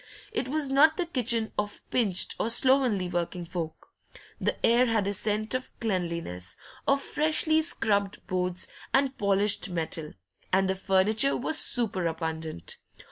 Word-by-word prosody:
It 260 - -2
was 285 0 -1
not 310 +3 +5
the 355 - 0
kitchen 235 -7 0
of 205 0 -4
pinched 205 -8 +2
or 225 - 0
slovenly 245 -6 +3
working 175 0 -3
folk; 165 -2 -6 0.5
the - - 0
air 240 +2 +4
had 220 -3 +1
a 200 - 0
scent 215 +3 0
of 255 0 -2
cleanliness, 170 - -3 0.3
of 275 0 +4
freshly 310 +2 +1
scrubbed 205 - 0
boards 180 -1 -1 0.3
and 270 0 +2
polished 200 0 +1
metal, 160 -3 -3 0.4
and 190 +1 +3
the 190 - +1
furniture 200 +7 +3
was 310 +5 +2
super 200 -8 0
abundant. 160 - -4
205 Hz, 140 wpm, -28 LUFS, 180-255 Hz, 0.5 s, not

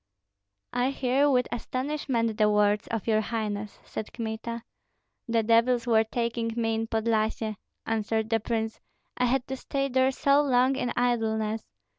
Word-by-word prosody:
"I 245 +1 +2
hear 275 +1 +2
with 250 -3 +3
astonishment 255 -3 -2
the 210 0 +5
words 210 0 +2
of 225 -3 -3
your 220 -1 +3
highness," 210 -2 -3
said 215 - -6
Kmita. 230 0 -4 0.6
"The 230 -1 +2
devils 235 +2 +3
were 225 -2 +4
taking 230 0 -2
me 225 -1 0
in 225 0 -1
Podlyasye," 220 -1 0 0.3
answered 220 0 -1
the 225 - +3
prince, 225 0 -2 0.4
"I 250 - +2
had 250 +1 +1
to 265 - -4
stay 275 +1 -2
there 260 0 +3
so 280 +1 +3
long 260 -1 +3
in 245 -2 -1
idleness. 220 -3 +1
230 Hz, 150 wpm, -27 LUFS, 220-250 Hz, 0.6 s, the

